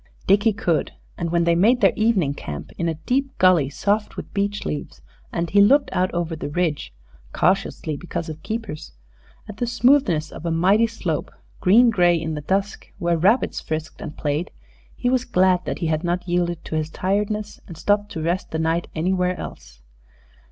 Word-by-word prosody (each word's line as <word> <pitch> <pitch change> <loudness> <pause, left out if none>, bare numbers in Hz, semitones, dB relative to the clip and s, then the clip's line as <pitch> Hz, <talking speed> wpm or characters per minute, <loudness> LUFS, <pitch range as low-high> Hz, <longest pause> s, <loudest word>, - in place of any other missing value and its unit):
Dickie 205 +3 +4
could; 190 -6 -1 0.2
and 170 -1 -3
when 170 0 +2
they 170 0 +3
made 220 +9 +4
their - - +4
evening 205 -10 +2
camp 75 - -7
in 170 -1 0
a 160 - -2
deep 265 - -2
gully 180 -7 +4
soft 205 +9 -1
with - - -8
beech 200 0 -1
leaves, 145 - -5 0.3
and 170 -1 -2
he 205 - +6
looked 275 +8 +4
out 185 0 +1
over 170 -1 -2
the 155 - -5
ridge 155 - -1 0.4
cautiously, 170 -3 0
because 170 +1 -5
of 160 0 -7
keepers 220 -9 -5 0.5
at 210 - -9
the 240 - -1
smoothness 245 - +2
of - - -9
a 170 - -1
mighty 190 +8 +3
slope, 180 -9 -3 0.3
green 230 +6 +5
gray 175 -4 +3
in 160 0 -3
the 150 - -4
dusk, 195 +6 -2
where 170 -2 +1
rabbits 200 +10 +2
frisked 155 0 -5
and 150 - -7
played, 150 +3 -1 0.5
he - - -2
was 250 0 +2
glad 185 -6 +2
that - - -3
he - - -3
had 160 0 0
not 175 +1 -2
yielded 175 -1 -1
to - - -7
his 155 0 -1
tiredness 210 +4 -2
and 170 - -10
stopped 205 +3 +1
to 160 - -4
rest 175 +3 -1
the 160 - -3
night 165 +1 0
anywhere 180 +2 0
else. - - -9
180 Hz, 185 wpm, -22 LUFS, 160-205 Hz, 0.5 s, he